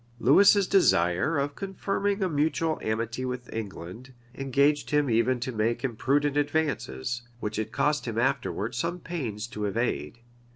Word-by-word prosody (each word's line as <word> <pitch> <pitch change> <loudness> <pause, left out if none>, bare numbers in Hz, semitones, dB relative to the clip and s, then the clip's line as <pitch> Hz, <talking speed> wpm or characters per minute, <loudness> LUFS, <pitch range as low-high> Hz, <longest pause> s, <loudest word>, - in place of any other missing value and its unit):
[*] - - -31
Lewis's 195 - +6
desire 150 - +3
of 140 +1 -1
confirming 195 +2 -2
a - - +2
mutual 160 0 0
amity 115 +3 -2
with 125 -1 -5
England, 110 +4 -7 0.2
engaged 140 +3 +1
him 150 -3 +2
even 115 +3 +2
to 130 +2 -3
make 115 +2 -1
imprudent 140 +4 +1
advances, 145 - -1 0.2
which 105 -1 -3
it 110 - -3
cost - - 0
him - - -3
afterwards 115 +4 -1
some 175 +4 -2
pains 125 -12 -4
to 105 -3 -5
evade. 105 - -2
130 Hz, 150 wpm, -27 LUFS, 115-150 Hz, 0.2 s, Lewis's